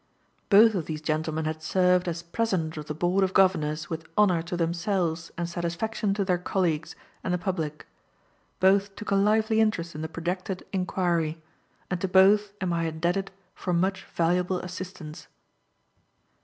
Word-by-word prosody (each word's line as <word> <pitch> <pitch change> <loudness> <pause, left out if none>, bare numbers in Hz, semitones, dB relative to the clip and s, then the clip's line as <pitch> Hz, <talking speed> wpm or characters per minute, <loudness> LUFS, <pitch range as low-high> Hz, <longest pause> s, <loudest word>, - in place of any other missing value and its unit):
Both 220 +2 +7
of 180 -6 -2
these 155 -1 -3
gentlemen 155 0 -2
had 155 0 -3
served 180 +2 +2
as 170 0 -3
President 175 -3 -1
of 150 -1 -7
the 150 - -4
Board 180 +4 +2
of 190 0 -1
Governors 155 -5 +2
with 165 0 -6
honor 185 -5 +4
to 170 +1 -4
themselves 170 -1 -1
and 170 0 -2
satisfaction 175 +5 -2
to 200 -1 0
their 180 -2 +1
colleagues 170 -4 -1 0.3
and 185 - -2
the 180 - +2
public; 165 -5 -3 0.7
both 195 +1 +3
took 210 - -6
a - - +4
lively 220 +2 +3
interest 175 -6 0
in 155 - -6
the 160 - -4
projected 180 +3 -4
inquiry, 175 -4 0 0.5
and 180 -1 -1
to 190 - 0
both 195 +2 +5
am 185 -3 -1
I 165 0 0
indebted 175 +5 -1 0.2
for 180 - -3
much 190 +3 0
valuable 180 +2 0
assistance. 180 -3 -8
180 Hz, 160 wpm, -27 LUFS, 165-190 Hz, 0.7 s, Both